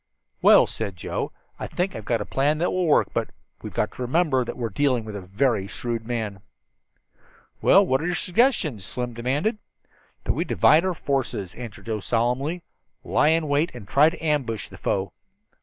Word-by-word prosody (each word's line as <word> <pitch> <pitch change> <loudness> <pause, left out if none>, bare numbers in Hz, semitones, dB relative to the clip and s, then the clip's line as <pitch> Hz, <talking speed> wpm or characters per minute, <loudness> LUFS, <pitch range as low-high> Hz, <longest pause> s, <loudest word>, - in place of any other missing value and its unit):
"Well," - - +7
said 95 - -4
Joe, 85 - -4 0.3
"I - - -4
think 185 +2 -2
I've 110 - -7
got 115 -2 0
a - - -3
plan 145 +3 +1
that 170 +3 0
will 185 -2 0
work; 150 - +4
but - - -1 0.3
we've - - -7
got - - -1
to - - -10
remember 130 0 +2
that - - -6
we 125 - -5
are - - -2
dealing 130 -1 +1
with 105 -1 -7
a 100 - -5
very 100 +2 0
shrewd 115 +1 -4
man." 110 -5 -3 1.2
"Well, 195 +1 +6
what's 135 -3 +1
your 175 0 0
suggestion?" 180 - +1
Slim 120 +5 -5
demanded. 140 - -1 0.6
"That - - 0
we - - -1
divide 160 +4 +4
our 185 -2 0
forces," 130 - -2
answered 115 -5 -9
Joe 110 -2 -2
solemnly, 125 - -1 0.4
"lie 150 - +2
in 160 -1 +2
wait 145 +3 +2
and 110 -5 -10
try 145 +9 +5
to 165 - -10
ambush 130 - -1
the - - -12
foe." 95 -3 -1
130 Hz, 190 wpm, -24 LUFS, 110-155 Hz, 1.2 s, Well